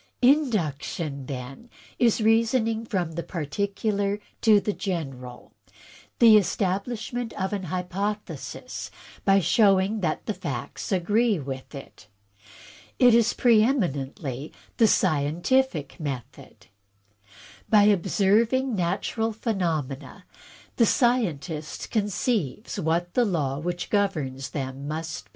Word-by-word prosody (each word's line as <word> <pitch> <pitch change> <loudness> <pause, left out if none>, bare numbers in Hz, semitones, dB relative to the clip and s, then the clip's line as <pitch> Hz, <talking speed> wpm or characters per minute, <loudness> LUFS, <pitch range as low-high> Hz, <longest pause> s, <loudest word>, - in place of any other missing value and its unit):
"Induction, 170 - +1
then, 135 - -7 0.3
is 235 -2 +3
reasoning 225 0 +2
from 180 -7 -1
the 165 +1 -4
particular 200 +5 -2 0.2
to 215 -2 +6
the 210 +1 -2
general; 135 - -5 0.6
the 225 -3 +8
establishment 215 +5 -2
of 190 +2 -1
an 195 -2 -3
hypothesis 185 +4 -4 0.4
by 195 0 +5
showing 195 +3 +3
that 165 -5 -2
the 215 - -1
facts 135 - -5
agree 205 +4 +2
with 135 -1 -7
it. 135 -5 -11 0.9
It 245 -2 +6
is 235 0 +4
preeminently 165 - +1 0.3
the 225 - +5
scientific 170 - +1
method. 135 -2 -7 1.0
By 210 -2 +6
observing 215 +6 +2
natural 200 +5 -1
phenomena, 170 - -3 0.5
the 230 - +5
scientist 170 - 0
conceives 205 - -1
what 170 +2 0
the 245 - +3
law 150 - -1
which 175 +2 -4
governs 155 -11 -1
them 135 0 -5
must 160 +1 -5
be. - - -29
190 Hz, 105 wpm, -25 LUFS, 150-220 Hz, 1.0 s, the